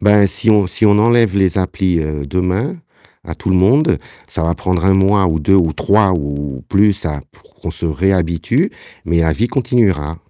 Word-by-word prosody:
Ben, 105 Hz, 0 st, +4 dB
si 100 Hz, +3 st, -1 dB
on 105 Hz, -3 st, +3 dB
si 100 Hz, -, -2 dB
on 105 Hz, 0 st, +4 dB
enlève 115 Hz, -2 st, +2 dB
les 95 Hz, -3 st, +1 dB
applis, 90 Hz, -1 st, -1 dB
heu, 75 Hz, -2 st, -4 dB
demain, 90 Hz, -, -2 dB, 0.5 s
à -, -, -7 dB
tout -, -, -7 dB
le 95 Hz, -, +2 dB
monde, 130 Hz, -, +3 dB, 0.3 s
ça -, -, -4 dB
va 85 Hz, +1 st, 0 dB
prendre 90 Hz, -1 st, -2 dB
1 95 Hz, -, +4 dB
mois 95 Hz, +1 st, +2 dB
ou 80 Hz, -2 st, 0 dB
2 95 Hz, +6 st, +2 dB
ou 85 Hz, -5 st, +2 dB
3 100 Hz, +5 st, +2 dB
ou 70 Hz, -3 st, -5 dB
plus, 100 Hz, -1 st, +1 dB
hein, 75 Hz, -3 st, -4 dB
pour -, -, -25 dB
qu'on -, -, -7 dB
se -, -, -5 dB
réhabitue, 85 Hz, +1 st, 0 dB, 0.3 s
mais 85 Hz, +1 st, 0 dB
la 80 Hz, -1 st, +1 dB
vie 115 Hz, +9 st, -1 dB
continuera. 105 Hz, -, 0 dB
95 Hz, 200 wpm, -16 LUFS, 80-105 Hz, 0.5 s, Ben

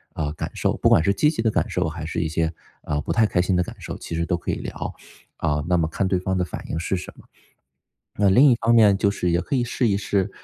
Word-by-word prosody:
呃， 75 Hz, -2 st, -2 dB
感 -, -, -5 dB
受。 -, -, 0 dB
不 -, -, +3 dB
管 -, -, +5 dB
是 100 Hz, +2 st, +2 dB
积 150 Hz, -, +3 dB
极 150 Hz, -8 st, -2 dB
的 110 Hz, -, +2 dB
感 -, -, 0 dB
受 -, -, -1 dB
还 80 Hz, +1 st, -6 dB
是 80 Hz, -, -3 dB
一 85 Hz, -, 0 dB
些， 80 Hz, +1 st, -1 dB, 0.3 s
呃， 75 Hz, 0 st, -2 dB
不 -, -, -2 dB
太 115 Hz, -2 st, +3 dB
开 90 Hz, -, 0 dB
心 90 Hz, +1 st, +1 dB
的 90 Hz, -, +3 dB
感 -, -, -6 dB
受， -, -, -6 dB
其 85 Hz, -, -6 dB
实 85 Hz, 0 st, -1 dB
都 85 Hz, -, 0 dB
可 85 Hz, -, -6 dB
以 -, -, +1 dB
聊。 -, -, -6 dB, 0.4 s
啊， 75 Hz, 0 st, -1 dB
那 90 Hz, 0 st, +2 dB
么 80 Hz, -2 st, +1 dB
看 95 Hz, +4 st, -1 dB
对 95 Hz, -, +1 dB
方 95 Hz, +1 st, -2 dB
的 90 Hz, -, +1 dB
反 90 Hz, -, -7 dB
应 80 Hz, -, -2 dB
是 90 Hz, +2 st, -1 dB
什 90 Hz, -, -8 dB
么？ -, -, -17 dB, 0.9 s
那 100 Hz, -1 st, +2 dB
另 130 Hz, +9 st, +6 dB
一 120 Hz, -, +4 dB
方 115 Hz, 0 st, +2 dB
面 105 Hz, -3 st, +6 dB
就 100 Hz, -, +2 dB
是 90 Hz, -3 st, -1 dB
也 85 Hz, +1 st, +2 dB
可 140 Hz, -, -2 dB
以 125 Hz, -, +1 dB
试 120 Hz, 0 st, 0 dB
一 100 Hz, -, +2 dB
试 100 Hz, -1 st, -1 dB
90 Hz, 310 characters per minute, -23 LUFS, 85-105 Hz, 0.9 s, 另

